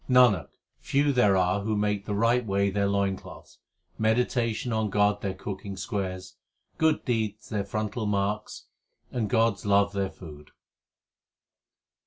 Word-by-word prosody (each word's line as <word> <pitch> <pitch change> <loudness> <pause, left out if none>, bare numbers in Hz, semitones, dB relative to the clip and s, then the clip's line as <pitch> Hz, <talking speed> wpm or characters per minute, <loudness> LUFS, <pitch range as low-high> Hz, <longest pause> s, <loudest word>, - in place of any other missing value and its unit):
Nanak, 125 - +5 0.3
few 140 +1 +1
there 105 -7 +4
are 90 +2 +2
who 110 +1 -1
make 105 -1 0
the 105 - -2
right 115 +4 +2
way 100 -2 +1
their 100 0 +1
loin 100 -1 +1
cloths, - - -13 0.4
meditation 115 +1 +1
on 110 -1 0
God 105 +1 +2
their 95 -1 -3
cooking 100 -1 -6
squares, 95 -3 -4 0.4
Good 160 -1 +2
deeds 110 -4 -2
their 100 -2 -2
frontal 110 +2 -3
marks, 100 +1 -2 0.5
and 115 -4 -2
God 115 0 +3
s - - -14
love 100 0 +3
their 100 -1 -1
food. 75 -6 -12
105 Hz, 145 wpm, -27 LUFS, 100-110 Hz, 0.5 s, Nanak